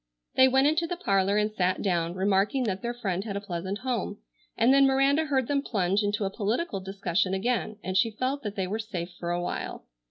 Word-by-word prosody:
They 260 - +6
went 265 +1 +3
into 315 +3 +2
the 355 - -3
parlor 195 - +2
and 210 0 +1
sat 185 -3 0
down, 175 -3 0
remarking 195 +6 +2
that 195 -4 -2
their 235 - -2
friend 195 -6 -2
had 200 -2 -4
a - - -1
pleasant 190 0 -4
home, 245 -5 -2 0.4
and 235 +4 +5
then 275 0 +6
Miranda 275 +3 +3
heard 265 -5 0
them 285 -1 +1
plunge 195 -5 0
into 205 0 0
a 195 - -2
political 220 - -1
discussion 190 -1 -1
again 220 +1 -1
and 185 +1 -3
she 225 - +4
felt 255 +6 -2
that 210 -5 -5
they 190 - -1
were 205 +4 -3
safe 185 -5 -5
for 170 - -4
a 175 0 0
while. 175 - -4
205 Hz, 220 wpm, -27 LUFS, 190-255 Hz, 0.4 s, They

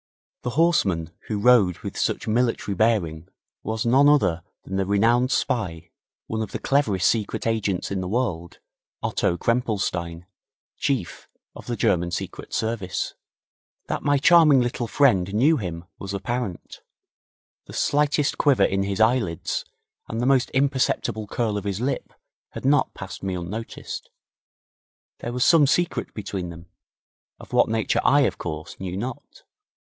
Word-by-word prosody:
The 125 - -3
horseman 100 - +2 0.2
who 105 - -2
rode 105 -6 +5
with - - -6
such - - -1
military 115 -2 0
bearing 90 -6 0 0.3
was 110 +2 -3
none 135 +5 +5
other 90 - +3 0.2
than 95 - -6
the 95 -1 0
renowned 115 +5 +3
spy, 90 - -1 0.3
one 110 0 -3
of 110 - -4
the - - -3
cleverest 110 -10 +1
secret 110 -1 -1
agents 105 -6 -1
in 95 -1 -1
the 90 - -4
world, 90 -6 -2 0.5
Otto 85 - 0
Krempelstein, 95 -8 -1 0.5
Chief 130 -11 -2 0.3
of - - -11
the 120 - -2
German 85 -4 +1
Secret 85 - -6
Service. 110 -5 -2 0.7
That - - -3
my 145 -1 +2
charming 155 -1 +6
little 120 -1 -2
friend 100 -9 +3
knew 150 +8 +4
him 85 -5 -5
was 100 0 -5
apparent. 115 -2 -4 0.8
The - - -12
slightest 145 0 +1
quiver 140 -4 +4
in 95 0 0
his 100 0 -2
eyelids 110 -7 +1 0.4
and 115 - -4
the - - 0
almost 130 0 +3
imperceptible 130 -5 0
curl 110 -1 -1
of 100 - -4
his 100 -1 -2
lip 130 +4 -2 0.4
had - - -7
not 145 +2 +2
passed 95 -2 -8
me 95 -1 -2
unnoticed. 95 +6 -6 1.1
There 120 - -4
was 125 0 +1
some 160 -4 +6
secret 175 +5 0
between 100 -4 -4
them, 85 0 -10 0.7
of - - -13
what - - +4
nature 110 -1 +1
I, 145 +1 +5
of 135 - 0
course, 80 -1 -6
knew 95 -1 -4
not. 120 +4 -7
110 Hz, 150 wpm, -24 LUFS, 95-125 Hz, 1.1 s, charming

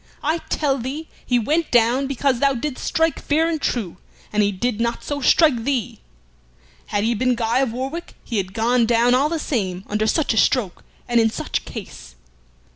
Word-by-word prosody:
I 315 +3 +1
tell 275 -3 0
thee 280 +7 -5
he 245 - +1
went 305 +8 0
down 245 +3 +3
because 270 -1 0
thou 275 0 +3
didst 255 +2 -4
strike 325 0 0
fair 315 +2 +1
and 320 -3 -2
true, 200 -8 -2 0.4
and 210 - +3
he 205 0 +2
did 220 +3 -2
not 235 0 -1
so 290 -1 -3
strike 265 -3 +4
thee. 260 -4 -2 0.9
Had 205 -1 -1
he 230 +2 +2
been 250 +2 +1
Guy 235 +1 +1
of 265 -4 +1
Warwick 270 +8 -5
he 230 - -3
had 190 -1 -3
gone 235 +1 +2
down 240 +1 +3
all 275 +4 +3
the 335 - -1
same 190 - -2
under 215 +1 -1
such 305 0 +1
a - - -3
stroke 220 -8 +1 0.2
and 240 -1 +3
in 225 -1 +4
such - - -3
case." - - -9
245 Hz, 195 wpm, -21 LUFS, 225-285 Hz, 0.9 s, strike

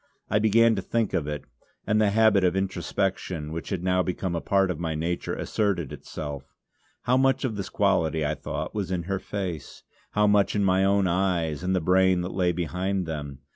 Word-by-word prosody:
I 105 - +3
began 115 +2 +4
to 100 - -2
think 115 +2 -1
of 85 -6 0
it; 75 -2 -4 0.4
and 105 +2 +2
the 105 - +4
habit 105 -2 +4
of 90 0 +2
introspection, 90 -4 -2
which 85 0 -5
had 95 -3 -3
now 90 0 +2
become 90 0 -2
a 85 - -2
part 95 -1 +2
of 80 - -5
my 80 -2 -2
nature, 85 +3 -2
asserted 95 -9 -1
itself. 70 -3 -7 0.5
How 125 +1 +3
much 135 0 +2
of 115 -4 -2
this 100 -2 -4
quality 80 -6 +1
I 75 - 0
thought, 70 - -5
was 100 -4 -3
in 90 -2 -2
her 95 +2 -2
face, 95 -7 -5 0.3
how 105 0 +3
much 105 0 +3
in 105 - +2
my 95 0 +3
own 100 0 +3
eyes 85 -4 0
and 95 +1 0
the 90 - +1
brain 95 +1 +3
that 90 - -4
lay 90 -2 +2
behind 90 +3 -2
them. 75 -4 -6
95 Hz, 205 wpm, -26 LUFS, 85-100 Hz, 0.5 s, began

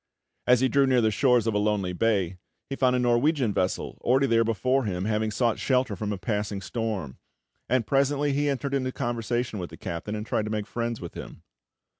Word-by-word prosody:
As 125 0 +5
he 130 - +4
drew 135 +2 +3
near 130 -1 +3
to 120 - +3
the 110 - +3
shores 125 +1 +3
of 115 - 0
a 105 - +1
lonely 105 -3 0
bay, 95 -3 0 0.3
he - - -1
found 130 -2 +2
a - - +2
Norwegian 125 0 +2
vessel 90 0 -2
already 130 +3 +3
there 115 -3 +3
before 125 +4 +1
him, 90 -2 -2
having 110 0 0
sought 115 +1 0
shelter 125 -5 +1
from 105 +3 -3
a 100 - -2
passing 105 0 -2
storm, 105 - -4 0.5
and 125 -2 +2
presently 140 +4 +1
he 145 +1 +1
entered 140 0 -2
into 130 -2 0
conversation 120 -2 -2
with 90 - -5
the - - -11
captain, 85 +6 -5
and 105 0 -4
tried 110 - -1
to 110 - -4
make 105 -1 -2
friends 115 0 -3
with 85 - -8
him. - - -9
115 Hz, 215 wpm, -26 LUFS, 105-130 Hz, 0.5 s, As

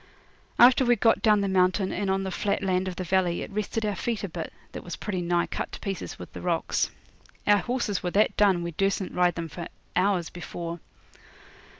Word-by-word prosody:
After 250 +2 +7
we'd 240 -3 +3
got 225 - +4
down 210 -2 +4
the 200 - 0
mountain 190 +1 +2
and 200 -2 -2
on 195 0 +1
the 190 - -3
flat 200 +2 -1
land 185 -1 +1
of 185 - -4
the 185 - -3
valley 180 -1 +1
it - - -8
rested 215 +2 -2
our 210 - 0
feet 225 +3 -2
a 200 - -3
bit, 165 -1 -5 0.2
that - - -7
was 175 - -6
pretty 190 -4 -3
nigh 175 0 +1
cut - - -4
to - - -6
pieces 195 -2 -5
with - - -10
the - - -7
rocks. - - 0 0.6
Our 205 0 +5
horses 240 -5 -1
were 180 - -1
that 205 +4 +2
done 195 -4 +3
we 170 - -3
dursn't 195 +2 -1
ride 180 -2 +2
'em 165 0 -3
for 165 +3 -6 0.3
hours 180 -2 +1
before. 170 -1 -6
190 Hz, 215 wpm, -27 LUFS, 175-205 Hz, 0.6 s, After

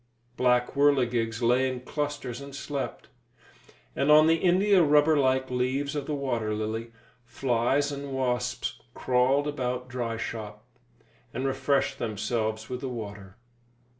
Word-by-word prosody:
Black 125 -1 +2
whirligigs 125 -5 +2
lay 125 +3 +3
in 125 -1 -6
clusters 145 -2 -4
and 140 0 -9
slept; 140 0 -5 0.9
and 140 - 0
on 155 +1 +8
the 165 +1 +4
india 190 +2 +4
rubber 150 0 +4
like 130 -2 +1
leaves 130 +3 -1
of 145 -2 -3
the 150 - -1
water 120 -6 -2
lily, 110 +2 -4 0.3
flies 125 +3 0
and 140 0 -6
wasps 125 -1 -2
crawled 130 +3 +2
about 125 -3 -3
dry 120 -2 -3
shop, 105 -2 -6 0.7
and 130 - -2
refreshed 135 +1 0
themselves 110 0 -2
with 125 +1 -5
the 135 - -3
water. 105 -4 -8
130 Hz, 135 wpm, -27 LUFS, 120-140 Hz, 0.9 s, on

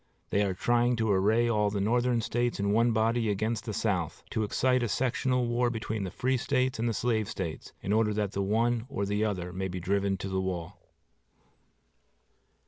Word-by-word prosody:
They 100 - +2
are 95 -2 0
trying 120 +4 +2
to 110 -2 +1
array 105 +5 +3
all 105 -3 +2
the 100 0 -2
Northern 120 +3 +2
States 120 +1 -1
in 100 0 +1
one 115 +3 +3
body 115 +1 +1
against 110 +3 -1
the 110 - -3
South, 90 -8 -1
to 110 - -1
excite 125 +4 +2
a 120 - 0
sectional 125 +2 +1
war 120 +1 +1
between 110 -3 -3
the - - -4
Free 130 +8 0
States 130 -1 0
and 120 +1 +1
the - - -1
Slave 110 -2 0
States, 85 -7 -5
in 100 - 0
order 110 -1 +3
that 105 -2 -1
the 100 - -2
one 115 +4 +1
or 100 -7 -2
the 105 +2 0
other 90 -4 -2
may 95 +1 -2
be 90 0 -5
driven 100 +2 0
to 95 - -5
the 95 0 -1
wall. 90 -3 -4
110 Hz, 200 wpm, -29 LUFS, 100-120 Hz, -, array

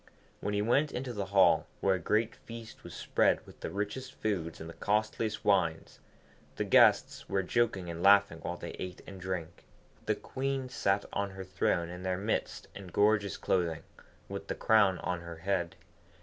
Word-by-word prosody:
When 105 - -2
he 105 - +1
went 140 +6 +2
into 125 0 -4
the 100 -3 -3
hall, 95 0 +4
where 95 - +3
a 95 - -1
great 110 +6 +1
feast 115 -1 -11
was - - -9
spread - - +2
with - - -15
the - - -4
richest 105 +6 -4
foods 90 -7 -2
and 80 - -7
the 85 - -8
costliest 105 +2 -1
wines, 90 -6 +1 0.6
the - - -1
guests - - +4
were 95 - +1
joking 105 -3 0
and 85 0 -5
laughing 100 -4 +5
while 85 +1 -4
they - - -6
ate 90 -1 -6
and 95 -1 -10
drank. 90 -3 -5 0.4
The - - +2
Queen 135 -1 -3
sat 100 -6 0
on 100 0 -1
her 95 0 -7
throne 90 -2 0
in 90 +1 -7
their 95 0 -1
midst 105 +4 -2
in 100 -2 -9
gorgeous 100 +2 +2
clothing, 85 -3 0 0.4
with - - -6
the - - -2
crown 100 -4 +4
on 90 -2 -3
her 85 -1 -8
head. 90 0 -1
100 Hz, 180 wpm, -31 LUFS, 90-110 Hz, 0.6 s, laughing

